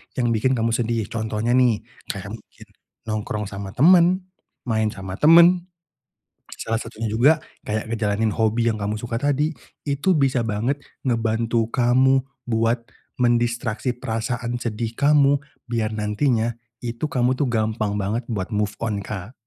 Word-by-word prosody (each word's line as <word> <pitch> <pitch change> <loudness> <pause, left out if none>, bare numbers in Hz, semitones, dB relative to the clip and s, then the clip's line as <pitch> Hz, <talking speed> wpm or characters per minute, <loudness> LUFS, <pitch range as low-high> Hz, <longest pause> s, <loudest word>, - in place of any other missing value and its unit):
yang 120 -2 +1
bikin 120 +4 +2
kamu 115 -1 0
sedih 115 -1 0
contohnya 110 +1 -2
nih, 125 -4 +3 0.2
kayak - - -5
mungkin - - -12 0.4
nongkrong 105 -1 -3
sama 100 -1 -7
temen, 175 +6 +5 0.4
main 110 -3 0
sama 95 -2 -6
temen. 170 +3 +6 0.9
Salah 115 0 -2
satunya 115 -1 -5
juga 120 +8 +5 0.3
kayak 110 +1 -3
ngejalanin 110 -1 0
hobi 115 +2 +1
yang 110 - -4
kamu 100 +1 -1
suka 120 -1 -3
tadi 145 +3 +1 0.4
itu 145 +7 +2
bisa 135 -5 +2
banget 115 +6 -1 0.3
ngebantu 115 -1 +1
kamu 130 +2 +4 0.3
buat 115 +1 +1 0.3
mendistraksi 120 0 +1
perasaan 120 +1 -3
sedih 115 0 -3
kamu 145 0 +4 0.3
biar 115 -2 -1
nantinya 110 +2 0 0.3
itu 120 +1 -6
kamu 125 -1 +2
tuh 130 -1 0
gampang 110 -2 0
banget 105 +4 -1
buat 95 -4 -2
move 105 0 0
on, 105 -3 -2
Kak. 100 +2 -6
115 Hz, 140 wpm, -23 LUFS, 110-130 Hz, 0.9 s, temen